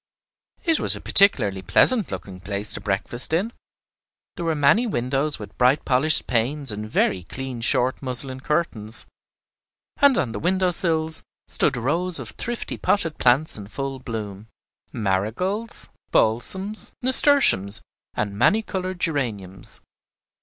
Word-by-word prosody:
It 330 -2 +2
was - - +7
a - - -7
particularly 105 - +3
pleasant 220 - +3
looking 95 -2 -8
place 100 +2 -3
to - - -6
breakfast 115 +8 -2
in. 200 +8 0 0.8
There 170 - -5
were 165 -1 0
many 150 +12 +3
windows 135 - -1
with 105 -1 -11
bright 130 +3 +3
polished 135 +5 +4
panes 130 +3 0
and 105 +1 -5
very 95 -4 +1
clean 130 +6 -7
short 125 +3 +1
muslin 130 0 0
curtains, 130 -7 -2 0.9
and 280 -3 +4
on 125 - -1
the - - -5
window 185 +1 +1
sills 160 -2 +3 0.3
stood 140 -4 +1
rows 165 +9 +1
of 125 -5 -6
thrifty 240 0 -5
potted 165 -6 +1
plants 125 +1 +2
in 100 - -9
full 135 +4 -5
bloom, 110 -4 -7 0.4
marigolds, 115 - -3 0.2
balsams, 190 - -1
nasturtiums, 255 - +3 0.3
and 100 -1 -3
many 215 - +2
colored 185 -3 -5
geraniums. 110 - -4
135 Hz, 130 wpm, -23 LUFS, 110-180 Hz, 0.9 s, was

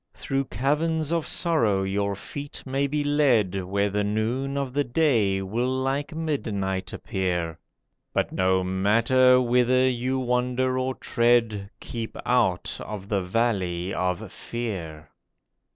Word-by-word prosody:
Through 135 0 -1
caverns 150 - 0
of 165 -2 0
sorrow 115 - +2
your 100 +1 -1
feet 145 +8 -8
may 135 +1 0
be 150 +1 -1
led, 120 -11 +2
Where 100 +2 0
the 105 +1 0
noon 115 +7 -1
of 135 -2 -2
the 145 +1 +2
day 120 -9 +2
will 115 +6 -1
like 135 +4 -1
midnight 100 -12 -2
appear. 90 -4 -2 0.5
But - - 0
no 95 0 +2
matter 115 +7 +4
whither 125 +1 +3
you 130 +1 0
wander 125 +1 0
or 130 0 -1
tread, 115 -4 +1
Keep 115 -2 -6
out 115 -8 +1
of 100 -2 -7
the 100 -3 +1
Valley 95 -3 -1
of 90 +2 -2
Fear. 85 -10 -5
120 Hz, 130 wpm, -25 LUFS, 95-130 Hz, 0.5 s, matter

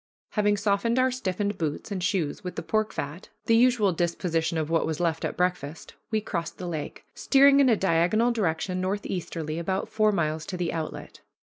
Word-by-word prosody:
Having 205 -1 +2
softened 205 +4 +1
our 255 0 +3
stiffened 205 -4 -2
boots 155 +5 -3
and 190 -3 -3
shoes 185 -6 -1
with 180 -1 -5
the - - -4
pork 215 0 0
fat, 150 +6 -6 0.2
the 230 - +4
usual 230 -5 +4
disposition 165 -1 -1
of 155 -1 -1
what 165 - +2
was 160 - -3
left 165 -2 0
at - - -3
breakfast, 175 -4 -2 0.2
we 220 - +1
crossed 170 -6 -4
the 180 - -5
lake, 160 -4 -5
steering 275 0 +5
in 275 -2 +5
a 225 - +4
diagonal 190 +7 +2
direction 185 -3 -1
northeastly 180 -5 -3
about 190 +3 -2
four 215 -1 +3
miles 155 -4 -1
to 185 - -4
the 175 -2 -2
outlet. 160 -2 -6
185 Hz, 190 wpm, -26 LUFS, 165-215 Hz, 0.2 s, steering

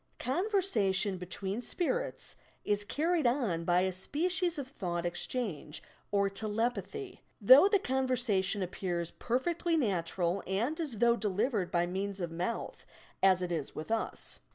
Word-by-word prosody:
Conversation 250 - +1
between 190 +4 -4
"spirits" 480 - -1 0.3
is 205 0 +1
carried 315 - +1
on 235 - 0
by 175 +1 +4
a 190 0 +1
species 340 - -1
of 280 -3 -4
thought 175 -9 -3
exchange 175 - -4 0.3
or 200 -1 +3
telep 215 +4 0
athy, 400 - -7 0.2
though 260 - +9
the 405 0 +4
conversation 245 - 0
appears 175 -2 -3
perfectly 330 +7 0
natural 185 - 0
and 230 - -1
as 310 -6 -2
though 235 +2 +4
delivered 210 -1 0
by 175 0 +2
means 195 +2 -3
of 175 -2 -3
mouth, 180 +7 -3 0.4
as 185 -1 +5
it 175 - -3
is 155 -5 -3
with 155 +8 -6
us. 225 -1 -3
210 Hz, 140 wpm, -32 LUFS, 185-270 Hz, 0.4 s, though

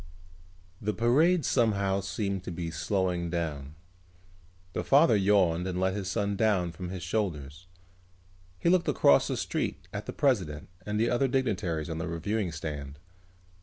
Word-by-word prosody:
The 105 +1 -1
parade 155 +9 +3
somehow 100 -5 +2
seemed 100 -1 -3
to - - -4
be 85 -1 -4
slowing 90 +1 -1
down. 75 -4 -4 1.0
The - - -2
father 140 -3 +5
yawned 95 -4 +3
and 90 -1 -2
let 95 0 +1
his 95 -2 -3
son 100 -1 -1
down 100 -5 +1
from 90 +2 -7
his 90 -2 -6
shoulders. 85 -5 -3 0.9
He - - -2
looked 175 0 +3
across 70 - +4
the - - -2
street - - -3
at - - -5
the - - -4
president 90 - 0 0.2
and 105 0 -1
the 115 +1 +2
other 125 +3 +2
dignitaries 105 - -1
on 80 -1 -4
the 90 - -3
reviewing 90 +4 -2
stand. 75 -2 -6
95 Hz, 155 wpm, -29 LUFS, 85-110 Hz, 1.0 s, father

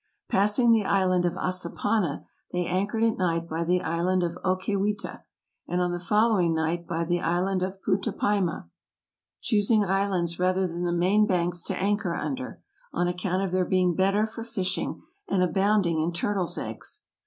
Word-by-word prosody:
Passing 210 +5 +3
the 225 -2 +4
island 185 -2 +2
of 175 - +1
Assapana 185 -1 -1 0.3
they 180 0 -1
anchored 200 +6 0
at 225 -2 +1
night 170 -2 0
by 165 +1 -2
the 180 +2 +1
island 175 +3 +1
of 170 -1 -2
Ocaywita, 200 +2 -1 0.5
and 175 - -1
on 180 0 +1
the 175 - -3
following 195 -2 +2
night 165 +2 -1
by 170 -1 -1
the 175 +1 0
island 180 +3 0
of 190 +1 -2
Putapayma, 195 - 0 0.7
choosing 210 0 +2
islands 190 -3 0
rather 185 +1 +2
than 175 0 -3
the 175 - 0
main 190 +5 +3
banks 175 -2 0
to - - -2
anchor 200 -3 0
under, 260 -2 -5 0.3
on 175 - 0
account 180 +1 -1
of 190 - -2
their 185 0 +2
being 180 -1 +2
better 195 +4 +2
for 225 +1 -7
fishing, 190 -5 -3 0.2
and 185 -2 +2
abounding 190 -2 +2
in 165 +2 0
turtles' 180 0 -1
eggs. - - -7
185 Hz, 165 wpm, -26 LUFS, 175-200 Hz, 0.7 s, the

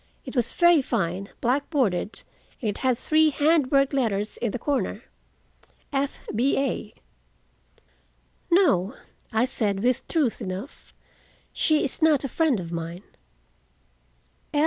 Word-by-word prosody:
It - - -8
was 240 -2 +1
very 345 -3 +5
fine, 195 -6 -2
black 265 +4 0
bordered, 225 - 0 0.4
and 230 - -3
it 205 - -2
had 255 -2 +1
three 310 +4 +3
hand 295 -1 +2
worked 275 0 +3
letters 215 -6 -1
in 235 - -1
the - - -3
corner—F. 280 +1 -5 0.2
B. 245 +6 +2
A." 275 0 -2 1.6
"No," 270 - +3 0.4
I 225 +1 +2
said 205 -5 -1
with 250 0 +1
truth 295 -9 0
enough, 190 - -7 0.6
"she 310 -1 +2
is 280 - -1
not 310 -3 +4
a 275 - -3
friend 300 -5 +1
of 170 -2 -7
mine." 170 +2 -5
255 Hz, 125 wpm, -25 LUFS, 205-290 Hz, 1.6 s, very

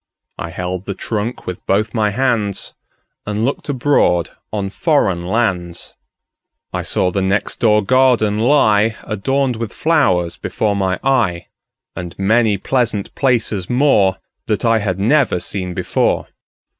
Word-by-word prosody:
I 85 - -4
held 90 +2 -4
the 100 - -4
trunk 110 +4 -4
with 90 - -6
both 105 +3 +1
my 105 -3 +1
handsAnd 115 -5 -1 0.5
looked 110 +8 -2
abroad 120 - +2 0.2
on 100 -2 -3
foreign 95 - +1
lands.I 90 -6 -5
saw 90 - 0
the 95 - -1
next 95 +2 -1
door 105 -2 +3
garden 120 -3 +3
lie, 110 -4 +3
Adorned 130 +4 -1
with 115 -2 -4
flowers, 95 - +1
before 105 -2 -1
my 95 -2 0
eye, 115 -11 +1 0.5
And 85 -1 -7
many 110 +1 +2
pleasant 115 -1 -1
places 115 -8 0
moreThat 110 -4 +1
I 115 -1 +3
had 100 -3 -2
never 120 -1 +2
seen 90 -1 -4
before. - - 0
105 Hz, 125 wpm, -18 LUFS, 95-120 Hz, 0.5 s, door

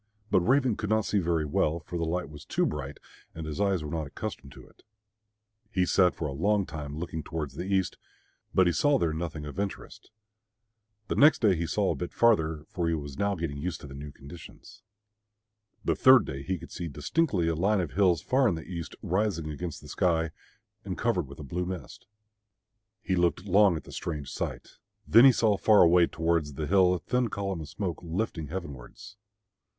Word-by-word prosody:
But - - +5
Raven 125 +4 +2
could 110 -1 -4
not 110 -1 +2
see 105 - +1
very 85 -3 0
well, 75 +2 0
for 85 - -9
the 85 -1 -1
light 85 +1 -2
was 75 0 -11
too - - 0
bright 70 +2 -4 0.4
and 80 -1 -6
his 75 +4 -4
eyes 95 -5 +1
were 75 - -6
not 80 -3 -3
accustomed 70 -2 -7
to - - -13
it. - - -24 0.9
He 95 -4 +1
sat 90 0 +3
for 80 - -3
a 100 +8 +1
time 75 -3 -7
looking 80 -1 -4
towards 75 -2 -5
the 90 - -5
east, 95 -2 0 0.5
but 95 - +4
he 85 - +2
saw 145 - +3
there 85 -9 0
nothing 80 -2 -4
of 75 +6 -7
interest. 100 -1 -5 1.0
The - - -1
next 150 -3 +5
day 100 -4 +5
he 85 0 -2
saw 100 +5 +1
a - - -2
bit 90 - -6
farther, 80 -10 +2
for 85 -2 -2
he 85 - +1
was 70 -3 -7
now 100 0 +1
getting 80 -4 -4
used 85 +2 -3
to - - -9
the 70 - -10
new 70 +1 -8
conditions. 70 +5 -13 1.0
The - - +2
third 130 -3 +6
day 70 0 -5
he 95 +6 -2
could 85 0 -12
see 85 - -5
distinctly 90 - 0
a 85 - +1
line 100 +6 +1
of 90 - -2
hills 90 -6 +2
far 130 0 +3
in 95 - +1
the 80 - -7
east, 85 -2 -6
rising 90 -5 -1
against 85 +2 -6
the - - -12
sky, 80 -2 +1 0.5
and - - -5
covered - - 0
with 70 - -11
a 75 - -8
blue 90 +6 -3
mist. 95 -2 -7 1.0
He 95 - 0
looked 90 +1 +1
long 100 -2 +4
at - - -8
the - - -13
strange 75 -5 -5
sight. - - -5 0.3
Then 115 +4 +8
he 135 - +9
saw 110 -4 +2
far 105 +1 +6
away 85 0 +5
towards 80 -3 -1
the 75 - -3
hill 90 +1 +4
a - - -4
thin 125 +8 0
column 100 -5 -3
of 75 - -8
smoke 95 -5 -4
lifting 85 -2 -3
heavenwards. 85 - -8
85 Hz, 205 wpm, -28 LUFS, 80-100 Hz, 1.0 s, he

